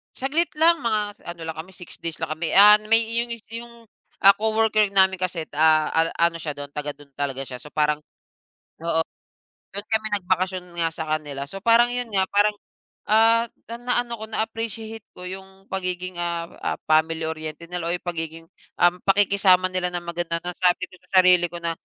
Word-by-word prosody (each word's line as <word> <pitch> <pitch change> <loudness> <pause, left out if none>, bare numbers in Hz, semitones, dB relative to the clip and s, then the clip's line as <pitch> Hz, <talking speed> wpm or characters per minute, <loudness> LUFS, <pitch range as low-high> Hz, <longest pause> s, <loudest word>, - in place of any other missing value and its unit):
Saglit 300 +6 0
lang. 330 -3 +4
Mga 220 -2 +1 0.2
s - - -31
ano 170 -1 -8
lang 160 - -4
kami, 165 +4 -8
6 180 -2 -9
days 165 -2 -3
lang 160 -1 -3
kami. 165 0 -2
Ah, 210 +1 +9
n 210 - -4
may 225 - +9
iyon 230 +1 -1
yus 235 -2 -5
'yong, 235 0 -8 0.3
ah, 195 +1 +7
coworker 220 0 +2
namin 190 -1 +4
kasi, 180 -3 -3
ah, 155 0 +4
an 165 0 +3
ano 170 0 +3
siya 155 -2 -4
do'n 145 0 -6
taga 150 0 -3
do'n 145 -1 -18
talaga 135 -1 -3
siya. 130 - -7
So 150 - -12
parang 150 0 +1 0.8
oo, 165 -1 +1 0.7
do'n 200 +1 -5
kami 220 -1 +1
nagbakasyon 185 0 -1
nga 165 - +1
sa 160 - -5
kanila, 145 -3 -3
so 195 - -7
parang 235 +1 +6
'yon 245 -2 -3
nga 190 -1 +3
parang, 205 +1 +3 0.5
ah, 225 +2 +5 0.3
na - - -3
na-ano 245 -1 -1
ko, 220 - -5
na-appreciate 225 0 -4
ko 180 - -10
'yong 190 +1 -10
pagiging, 185 -1 -3
ah, 170 -1 -2
ah, - - -1
family-oriented 160 0 0
nila 175 -2 -3
o - - 0
'yong - - -8
pagiging, 165 -1 -5 0.4
um, 175 0 +5
pakikisama 195 -2 +4
nila 185 -1 0
na 175 - -2
maganda 170 -1 -3
na 180 - -3
sabi 180 0 +2
ko 185 - -14
sa 190 -1 +5
sarili 180 -1 +5
ko - - -9
na, 170 - 0
185 Hz, 195 wpm, -23 LUFS, 165-215 Hz, 0.8 s, Ah